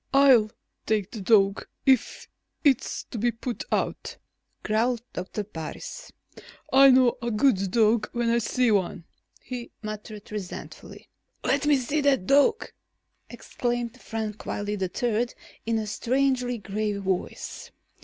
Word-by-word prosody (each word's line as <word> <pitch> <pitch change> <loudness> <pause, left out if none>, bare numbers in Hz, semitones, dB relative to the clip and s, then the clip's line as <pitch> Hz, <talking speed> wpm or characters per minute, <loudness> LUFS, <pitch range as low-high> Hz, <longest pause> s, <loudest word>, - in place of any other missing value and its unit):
"I'll 260 -6 +6 0.4
take 210 -2 0
the 220 - -6
dog, 200 -1 +3 0.2
if 265 -3 +2 0.4
it's 275 -5 +2
to 230 - -4
be 240 +3 +2
put 235 +1 -5
out," - - -2 0.5
growled 230 +2 +1
Doctor 205 +3 -4
Parris. 195 - -8 0.6
"I 270 +1 +8
know 255 -2 +4
a 235 - -2
good 210 -4 +2
dog 220 +1 +3
when 235 -1 0
I 235 - +3
see 240 +1 +1
one," 185 -4 0 0.4
he 245 -2 -6
muttered 215 0 -7
resentfully. 205 -4 -8 0.4
"Let 280 +2 +1
me 295 -1 +5
see 280 +4 -1
that 275 -9 +2
dog!" 285 - +3 0.6
exclaimed 240 +1 -4
Frank 220 -2 -5
Wiley 205 0 -2
III 215 +4 -1 0.4
in 230 -1 +1
a 220 - -2
strangely 250 +2 0
grave 205 0 -3
voice. 190 -1 -3
230 Hz, 130 wpm, -26 LUFS, 210-255 Hz, 0.6 s, I